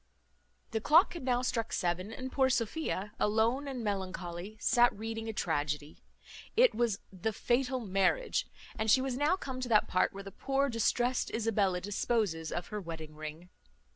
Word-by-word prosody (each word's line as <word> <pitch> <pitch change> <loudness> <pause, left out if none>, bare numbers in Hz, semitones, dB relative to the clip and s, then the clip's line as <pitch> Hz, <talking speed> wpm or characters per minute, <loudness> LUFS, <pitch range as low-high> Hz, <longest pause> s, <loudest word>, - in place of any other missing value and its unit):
The 220 - -1
clock 325 - +5
had 340 - -6
now 250 -1 +1
struck 230 -3 -1
seven, 180 +3 -1
and 260 +3 -6
poor 265 -1 +3
Sophia, 230 -4 -1
alone 225 +6 +2
and 260 -4 -4
melancholy, 190 -1 -4
sat 240 -1 +4
reading 225 +1 -4
a - - 0
tragedy. 150 -5 -2 0.6
It - - +6
was 230 -4 +1 0.2
the 190 +4 -2
Fatal 250 +4 0
Marriage; 210 - +1 0.3
and 220 0 0
she 260 - +7
was 260 -1 -1
now 295 +7 +3
come 260 -8 -6
to 250 - -3
that 215 -2 +4
part 185 - +2
where 195 0 -8
the 195 - -8
poor 275 +6 0
distrest 240 +2 +1
Isabella 205 -5 +1
disposes 200 -5 -1
of 175 - -4
her 210 -1 -4
wedding 160 -3 -7
ring. 155 +3 -8
220 Hz, 170 wpm, -32 LUFS, 185-255 Hz, 0.6 s, she